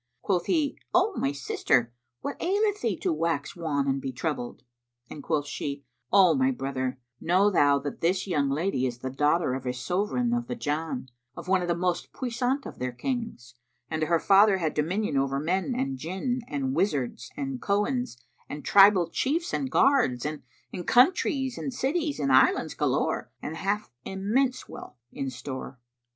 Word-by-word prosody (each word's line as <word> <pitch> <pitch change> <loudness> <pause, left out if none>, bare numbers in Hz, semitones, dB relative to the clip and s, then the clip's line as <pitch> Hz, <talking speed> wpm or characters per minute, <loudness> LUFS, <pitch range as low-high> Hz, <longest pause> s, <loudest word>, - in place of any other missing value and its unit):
Quoth 180 -3 0
he, 300 -4 +1 0.2
"O 380 +4 +4
my 135 - 0
sister, 130 -3 0 0.3
what 280 - -4
aileth 410 +2 +1
thee 215 -7 0
to - - 0
wax 160 -2 -1
wan 150 -5 -1
and 135 0 0
be 135 - -3
troubled?"; 125 -3 -4 0.5
and 150 - -7
quoth 150 -1 -1
she, 140 -1 -5 0.3
"O 190 -3 +6
my 265 0 +2
brother, 135 - -3 0.2
know 185 +5 +3
thou 145 -6 +4
that 140 0 -6
this 185 +3 +1
young 145 -7 0
lady 140 -2 0
is 120 -1 -5
the 130 +1 -5
daughter 150 +1 +2
of 130 -1 -4
a 125 - 0
Sovran 205 - -1
of 240 0 -1
the 245 - -3
Jann, 150 - -3 0.3
of - - -8
one 190 0 +3
of 175 - -2
the 170 - +1
most 180 0 -2
puissant 255 +2 -1
of - - -9
their 125 0 -2
Kings, 175 - -4 0.4
and 160 0 -2
her 165 +1 +2
father 200 +1 +5
had 160 -4 -1
dominion 165 +1 0
over 135 0 +1
men 185 - -1
and 135 - -2
Jinn 190 - -2
and 135 -2 -2
wizards 145 - -1
and 135 -2 -4
Cohens 210 - 0 0.3
and 145 0 -7
tribal 195 -3 +6
chiefs 325 - -1
and 270 - -1
guards 255 - +3
and 150 0 -3 0.5
countries 265 - +3
and 275 - -3
cities 290 +4 -1
and 140 -1 +1
islands 130 - +4
galore - - 0
and 155 - -5
hath 205 +4 -2
immense 240 +7 0
wealth - - -10
in 135 - -4
store. 130 +1 -7
170 Hz, 170 wpm, -27 LUFS, -, 0.5 s, O